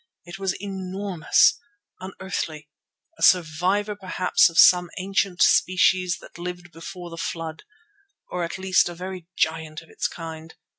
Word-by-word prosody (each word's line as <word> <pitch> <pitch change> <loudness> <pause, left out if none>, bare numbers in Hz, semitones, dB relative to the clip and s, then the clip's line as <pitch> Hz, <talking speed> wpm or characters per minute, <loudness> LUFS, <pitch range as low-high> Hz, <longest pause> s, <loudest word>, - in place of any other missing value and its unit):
It 175 +1 -9
was 190 -1 -2
enormous, 190 -3 +1 0.4
unearthly; 175 -5 -6 0.5
a - - -13
survivor 185 +5 +2
perhaps 185 -3 +2
of 165 - -9
some 180 -1 +7
ancient 195 -1 0
species 185 -1 +3
that - - -14
lived 175 0 -7
before 175 +1 -9
the 165 - -8
Flood, 165 -1 -5 0.7
or 180 - -2
at 170 - -4
least 190 -2 +2
a 175 - -8
very 180 -1 -7
giant 160 -1 -1
of 165 - -20
its - - -2
kind. 160 -1 -9
180 Hz, 140 wpm, -24 LUFS, 165-190 Hz, 0.7 s, some